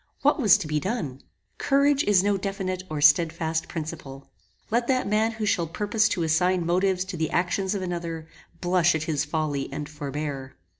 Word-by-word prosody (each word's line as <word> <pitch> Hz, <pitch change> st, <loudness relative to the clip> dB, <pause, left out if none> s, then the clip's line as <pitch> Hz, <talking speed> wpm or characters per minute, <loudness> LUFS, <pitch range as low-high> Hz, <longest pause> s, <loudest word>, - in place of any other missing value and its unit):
What -, -, +3 dB
was 215 Hz, -3 st, +6 dB
to 195 Hz, -7 st, -5 dB
be 150 Hz, 0 st, 0 dB
done? 155 Hz, -, -4 dB, 0.4 s
Courage 280 Hz, +1 st, +3 dB
is 195 Hz, -3 st, +4 dB
no 205 Hz, 0 st, +2 dB
definite 190 Hz, -1 st, -3 dB
or 155 Hz, -2 st, -3 dB
stedfast 160 Hz, +2 st, +3 dB
principle. 150 Hz, -4 st, -7 dB, 0.4 s
Let 235 Hz, +1 st, +1 dB
that 255 Hz, -1 st, +1 dB
man 215 Hz, +2 st, +1 dB
who 220 Hz, -1 st, -3 dB
shall 185 Hz, -5 st, +1 dB
purpose 210 Hz, +5 st, +1 dB
to 175 Hz, -, -1 dB
assign 175 Hz, +2 st, +2 dB
motives 185 Hz, +2 st, +1 dB
to 185 Hz, -2 st, -6 dB
the 160 Hz, -1 st, -1 dB
actions 185 Hz, +3 st, 0 dB
of 190 Hz, -, -3 dB
another, 170 Hz, -3 st, -4 dB, 0.3 s
blush 175 Hz, -2 st, +3 dB
at 160 Hz, -, -1 dB
his 155 Hz, -2 st, -1 dB
folly 150 Hz, -3 st, -2 dB
and 150 Hz, -1 st, -5 dB
forbear. 145 Hz, -2 st, -5 dB
175 Hz, 180 wpm, -25 LUFS, 155-200 Hz, 0.4 s, was